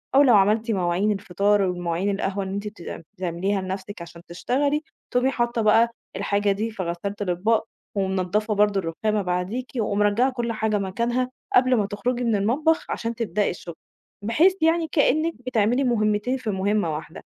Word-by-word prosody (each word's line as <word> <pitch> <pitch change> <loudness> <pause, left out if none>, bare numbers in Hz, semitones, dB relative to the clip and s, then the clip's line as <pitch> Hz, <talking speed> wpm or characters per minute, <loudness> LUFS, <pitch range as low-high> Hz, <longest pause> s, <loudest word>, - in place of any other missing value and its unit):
أو 275 - +8
لو 255 -5 +6
عملتِ 215 +3 +3
مواعين 185 +1 +1
الفطار 200 +1 +1
ومواعين 180 0 -1
القهوة 195 0 -1
إن 190 0 -5
أنتِ 200 +1 -3
بتع 205 -5 -7 0.2
بتعمليها 185 +2 -1
لنَفْسِك 190 0 -6
عشان 170 0 -10
تشتغلي، 280 - 0 0.3
تقومي 250 +2 +2
حاطّة 240 -2 0
بقى 225 +2 +5 0.3
الحاجة 200 0 +1
دي 215 +3 -2
في 200 -3 -4
غسّالة 175 +4 -4
الأطباق 205 +4 +1 0.3
ومنضّفة 195 +2 0
برضه 205 -1 +3
الرُخامة 210 +5 -1
بعديكِ 185 +8 -3
ومرجّعة 210 +3 +2
كل 240 -2 -2
حاجة 220 -1 0
مكانها 235 +6 -1 0.3
قبل 255 0 +5
ما 210 -4 +1
تخرجي 240 +5 -2
من 230 -2 +2
المطبخ 275 +11 +1
عشان 230 0 -3
تبدئي 210 -3 0
الشُغل، 170 -1 -7 0.5
بحيث 295 - +4
يعني 325 +1 +3
كإنِّك 310 +2 +2
بتعملي 240 +2 +2
مُهمّتين 215 0 +1
في 250 -4 -5
مُهمّة 195 -4 0
واحدة، 160 +2 -8
210 Hz, 160 wpm, -24 LUFS, 190-235 Hz, 0.5 s, أو